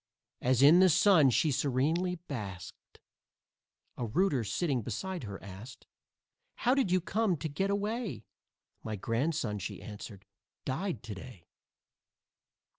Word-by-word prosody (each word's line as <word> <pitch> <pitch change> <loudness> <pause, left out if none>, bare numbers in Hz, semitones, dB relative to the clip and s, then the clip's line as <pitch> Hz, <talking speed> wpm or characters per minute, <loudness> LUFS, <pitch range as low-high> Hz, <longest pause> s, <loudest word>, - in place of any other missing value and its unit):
As 130 +1 +3
in 155 +5 +8
the 185 0 +7
sun 175 -4 +6
she 150 +6 +2
serenely 150 +8 +1
basked 100 - -7 1.0
A 120 - -2
rooter 145 - +1
sitting 130 - -1
beside 185 - -4
her 100 -2 -7
asked: 100 +6 -10 0.7
"How 250 - +2
did 270 -8 +2
you 185 - +4
come 195 0 0
to 145 - -3
get 190 +7 -1
away?" 205 - -2 0.6
"My 110 -1 -4
grandson," 115 - -1
she 95 - -5
answered, 105 -2 -9 0.4
"died 135 - -3
to 115 -3 -6
day!" 95 -2 -11
140 Hz, 125 wpm, -31 LUFS, 110-185 Hz, 1.0 s, in